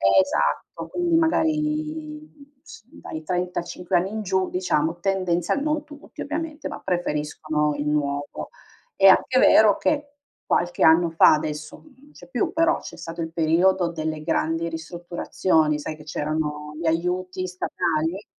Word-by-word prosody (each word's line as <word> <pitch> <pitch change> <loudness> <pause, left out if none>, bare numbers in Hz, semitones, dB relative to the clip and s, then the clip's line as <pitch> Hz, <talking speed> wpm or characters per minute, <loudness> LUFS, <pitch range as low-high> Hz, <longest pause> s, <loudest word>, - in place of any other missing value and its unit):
Esatto, 95 - +1
quindi 345 -1 0
magari, 305 -2 -1 0.2
s - - -13
dai 160 0 -8
35 180 0 -3
anni 185 +3 -1
in 220 0 -3
giù 190 -2 0
diciamo, 170 -2 0
tendenzial 185 - 0
non 305 0 0
tutti 295 -1 -12
ovviamente, 310 +1 -4
ma - - -7
preferiscono 150 -3 -1
il 145 +1 -3
nuovo. 145 -1 -2 0.5
È 195 - +6
anche 255 +7 +5
vero 215 -5 +6
che, 290 -1 -1 0.4
qualche 175 0 0
anno 165 +2 +6
fa 165 - +6
adesso 150 0 -3 0.2
non 285 +2 -20
c'è - - -15
più 290 +7 -1
però, 330 +1 +2
c'è - - -10
stato 170 0 -7
il 165 0 -5
periodo 170 +2 +2
delle 155 -1 -4
grandi 165 +1 -1
ristrutturazioni, 165 -1 -1
sai, 155 - -5
che 150 - -13
c'erano 150 0 -3
gli 170 - -5
aiuti 180 +3 -1
statali, 175 0 -2
175 Hz, 140 wpm, -24 LUFS, 155-220 Hz, 0.5 s, È